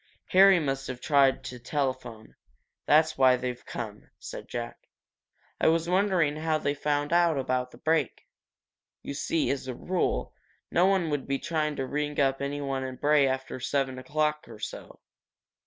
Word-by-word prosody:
"Harry 190 Hz, 0 st, +7 dB
must 135 Hz, -3 st, -2 dB
have 125 Hz, -1 st, -5 dB
tried 135 Hz, -2 st, +3 dB
to 125 Hz, -1 st, -7 dB
telephone 130 Hz, -4 st, -3 dB, 0.5 s
that's 155 Hz, 0 st, +4 dB
why 130 Hz, -1 st, +6 dB
they've 125 Hz, -1 st, -5 dB
come," -, -, -7 dB
said -, -, -8 dB
Jack. -, -, -6 dB, 0.7 s
"I -, -, +3 dB
was 165 Hz, +1 st, +2 dB
wondering 180 Hz, -5 st, +2 dB
how 160 Hz, 0 st, 0 dB
they 145 Hz, -2 st, -1 dB
found 145 Hz, +1 st, -1 dB
out 170 Hz, -3 st, +4 dB
about 130 Hz, -1 st, -1 dB
the 120 Hz, -, -15 dB
break. 155 Hz, 0 st, 0 dB, 0.8 s
You -, -, -5 dB
see, 155 Hz, +2 st, 0 dB
as 135 Hz, -1 st, -3 dB
a 130 Hz, -, -4 dB
rule, 180 Hz, +5 st, -1 dB, 0.4 s
no 180 Hz, +2 st, +4 dB
one 190 Hz, -5 st, +1 dB
would 145 Hz, -2 st, -3 dB
try 155 Hz, -2 st, 0 dB
to 135 Hz, -, -2 dB
ring 150 Hz, +2 st, -2 dB
up 135 Hz, -1 st, +2 dB
anyone 140 Hz, -1 st, -2 dB
in 130 Hz, -1 st, -5 dB
Bray 145 Hz, +1 st, +3 dB
after 130 Hz, 0 st, -3 dB
seven 130 Hz, 0 st, -1 dB
o'clock 150 Hz, +3 st, -1 dB
or 115 Hz, -, -11 dB
so. -, -, -8 dB
145 Hz, 160 wpm, -28 LUFS, 130-155 Hz, 0.8 s, Harry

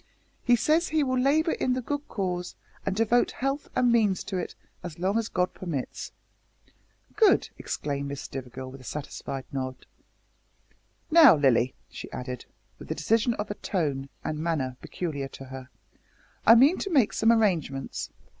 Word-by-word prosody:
He 245 Hz, -, +5 dB
says 315 Hz, +8 st, +2 dB
he 310 Hz, -1 st, +2 dB
will 255 Hz, -2 st, 0 dB
labour 305 Hz, +5 st, +3 dB
in 255 Hz, -, 0 dB
the 255 Hz, -, -1 dB
good 290 Hz, +3 st, -3 dB
cause, 180 Hz, -3 st, -3 dB, 0.3 s
and 195 Hz, -, 0 dB
devote 225 Hz, +3 st, +3 dB
health 275 Hz, +2 st, -2 dB
and 245 Hz, -1 st, +3 dB
means 215 Hz, -5 st, +2 dB
to 195 Hz, -, -5 dB
it 180 Hz, -, -4 dB, 0.3 s
as 170 Hz, -3 st, -7 dB
long 190 Hz, +4 st, 0 dB
as 230 Hz, -1 st, 0 dB
God 180 Hz, 0 st, 0 dB
permits." 160 Hz, -8 st, -5 dB, 1.0 s
"Good!" 430 Hz, -4 st, +4 dB
exclaimed 140 Hz, -1 st, -3 dB
Miss 140 Hz, 0 st, -5 dB
Stivergill 130 Hz, 0 st, -7 dB
with 135 Hz, 0 st, -11 dB
a -, -, -14 dB
satisfied 135 Hz, 0 st, -6 dB
nod. 130 Hz, -1 st, -4 dB, 1.3 s
"Now, 315 Hz, -, +9 dB
Lilly," 130 Hz, -3 st, +3 dB, 0.2 s
she -, -, -8 dB
added, 125 Hz, -1 st, -6 dB, 0.3 s
with -, -, -10 dB
the -, -, -3 dB
decision 225 Hz, +7 st, +2 dB
of 210 Hz, -1 st, -4 dB
tone 140 Hz, -7 st, -1 dB
and 155 Hz, -1 st, -3 dB
manner 155 Hz, -6 st, -1 dB
peculiar 145 Hz, -6 st, -4 dB
to 135 Hz, -, -11 dB
her, 130 Hz, 0 st, -9 dB, 0.8 s
"I 230 Hz, -, +10 dB
mean 275 Hz, +9 st, +6 dB
to 395 Hz, -, -3 dB
make 270 Hz, -, +3 dB
some 225 Hz, +1 st, +4 dB
arrangements. 170 Hz, -, 0 dB
185 Hz, 160 wpm, -27 LUFS, -, 1.3 s, I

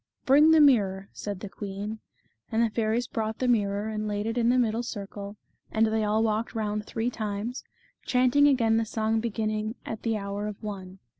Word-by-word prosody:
" -, -, -50 dB
Bring 295 Hz, +4 st, +6 dB
the 320 Hz, 0 st, +6 dB
mirror," 200 Hz, -9 st, +4 dB
said 200 Hz, -3 st, -5 dB
the 205 Hz, -, -5 dB
queen. 205 Hz, +2 st, -6 dB, 0.5 s
And 225 Hz, +1 st, +2 dB
the 230 Hz, -, +1 dB
fairies 225 Hz, +2 st, 0 dB
brought 220 Hz, -1 st, -3 dB
the 255 Hz, -, -1 dB
mirror 205 Hz, -3 st, +1 dB
and 215 Hz, -1 st, -3 dB
laid 205 Hz, 0 st, -2 dB
it 225 Hz, +1 st, -2 dB
in 235 Hz, -1 st, +2 dB
the 250 Hz, -, +4 dB
middle 230 Hz, -2 st, +1 dB
circle, 205 Hz, -2 st, -6 dB, 0.4 s
and 220 Hz, 0 st, +3 dB
they 220 Hz, 0 st, +1 dB
all 215 Hz, +1 st, +2 dB
walked 220 Hz, +1 st, -1 dB
round 210 Hz, -1 st, -2 dB
three 230 Hz, +2 st, -2 dB
times, 215 Hz, +2 st, -4 dB, 0.4 s
chanting 255 Hz, +3 st, +4 dB
again 230 Hz, -5 st, +3 dB
the 225 Hz, -, +2 dB
song 220 Hz, 0 st, 0 dB
beginning 215 Hz, -1 st, -2 dB
" -, -, -36 dB
At 220 Hz, -, -5 dB
the 225 Hz, -2 st, 0 dB
hour 200 Hz, +1 st, -4 dB
of 210 Hz, +1 st, -7 dB
one." 190 Hz, -3 st, -6 dB
220 Hz, 205 wpm, -27 LUFS, 205-230 Hz, 0.5 s, Bring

